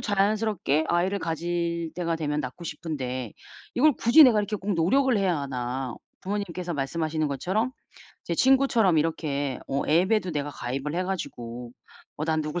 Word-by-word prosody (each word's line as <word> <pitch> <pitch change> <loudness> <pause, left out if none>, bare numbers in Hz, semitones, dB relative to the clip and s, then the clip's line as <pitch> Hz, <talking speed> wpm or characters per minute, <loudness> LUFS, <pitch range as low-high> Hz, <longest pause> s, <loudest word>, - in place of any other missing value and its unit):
자연스럽게 205 - +1
아이를 185 +3 +1
가질 170 0 -2
때가 170 -1 -1
되면 150 -2 -2
낳고 130 +5 -7
싶은데 130 - -4 0.4
이걸 295 +4 +5
굳이 240 +9 +7
내가 230 -5 +5
이렇게 205 +1 -3
꼭 200 0 -2
노력을 250 +10 +3
해야 185 -5 +1
하나?' 130 -2 -3 0.3
부모님께서 185 -3 -3
말씀하시는 155 +2 -1
것처럼 190 - -1 0.5
제 170 - -2
친구처럼 255 - +4
이렇게 145 -4 -1
어 140 +1 0
앱에도 185 +4 +3
내가 145 -2 -2
가입을 135 +3 -4
해 180 - 0
가지고 120 -10 -5 0.4
어 155 - -2
난 160 -1 +1
누굴 155 +4 -3
170 Hz, 350 characters per minute, -26 LUFS, 145-200 Hz, 0.5 s, 굳이